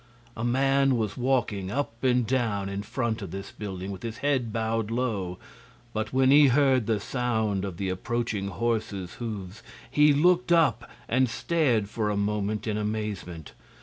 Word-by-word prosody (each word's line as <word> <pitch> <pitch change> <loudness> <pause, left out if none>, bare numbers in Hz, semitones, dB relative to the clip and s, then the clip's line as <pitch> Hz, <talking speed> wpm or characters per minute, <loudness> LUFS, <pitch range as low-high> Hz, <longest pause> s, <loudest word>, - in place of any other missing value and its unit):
A 115 - -4
man 135 +1 +3
was 105 -3 -2
walking 120 -7 0
up 120 -1 -3
and 125 -2 +3
down 110 -5 0
in 100 0 -3
front 115 0 -2
of 100 - -6
this 95 +3 -7
building, 95 -2 -6
with 95 -2 -7
his 115 -1 -5
head 135 -5 0
bowed 110 -1 -1
low; 110 -7 -2 0.6
but 110 0 -2
when 130 0 +4
he 145 0 +8
heard 130 -3 +3
the 110 -2 +1
sound 110 -4 -1
of 95 -4 -5
approaching 100 +2 -2
horses' 100 -3 -2
hoofs 105 -4 -5 0.3
he 150 0 +5
looked 175 +5 +3
up 165 -2 +3 0.2
and 130 +1 +2
stared 125 -7 +1
for 105 0 -2
a 105 - -1
moment 105 +1 -1
in 105 -2 -1
amazement. 105 -7 -4
110 Hz, 160 wpm, -27 LUFS, 100-130 Hz, 0.6 s, he